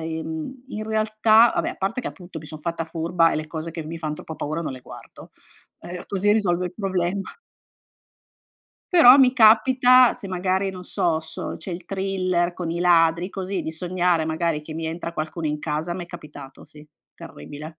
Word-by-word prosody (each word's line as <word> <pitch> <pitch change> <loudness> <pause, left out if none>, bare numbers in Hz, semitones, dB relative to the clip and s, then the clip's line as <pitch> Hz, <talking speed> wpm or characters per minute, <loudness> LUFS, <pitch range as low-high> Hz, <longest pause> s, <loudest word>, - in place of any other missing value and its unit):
in 160 - -5
in 215 -5 -5
realtà 220 +1 +4
va - - 0
beh, - - -2
a - - -11
parte 195 +6 -2
che - - -4
appunto 175 -3 -9
mi 155 - -12
son 155 +1 -8
fatta 165 +1 -3
furba 165 +1 +1
e - - -1
le 155 0 -4
cose 160 +1 -5
che 165 -1 -6
mi 165 +2 -7
fan 155 -2 -4
troppo 160 +1 -8
paura 155 +3 -3
non 155 - -4
le 130 - -8
guardo, - - -13 0.5
ehm, 175 0 -8
così 200 +1 +1
risolvo 180 -5 +1
il 180 - -4
problema. 190 -1 -1 1.7
Però 290 -8 +9
mi 260 -2 +6
capita 250 +2 +6
se 195 - -9
magari 190 +1 -1
non 185 -1 -8
so 165 -2 0
s 160 0 -6
c'è 190 - -7
il 170 0 -7
thriller 185 -2 -1
con 175 -2 -5
i 170 +1 -2
ladri 170 0 +3
così 190 0 -4
di 160 - -5
sognare 175 0 0
magari 160 -1 -1
che 155 +1 -9
mi 160 0 -4
entra 170 +1 -5
qualcuno 155 +1 -4
in 150 0 -2
casa 155 +3 -3
m'è 175 -1 -6
capitato. 150 -5 -11
Sì, 150 0 -15 0.3
terribile. 145 - -10
175 Hz, 190 wpm, -23 LUFS, 160-195 Hz, 1.7 s, Però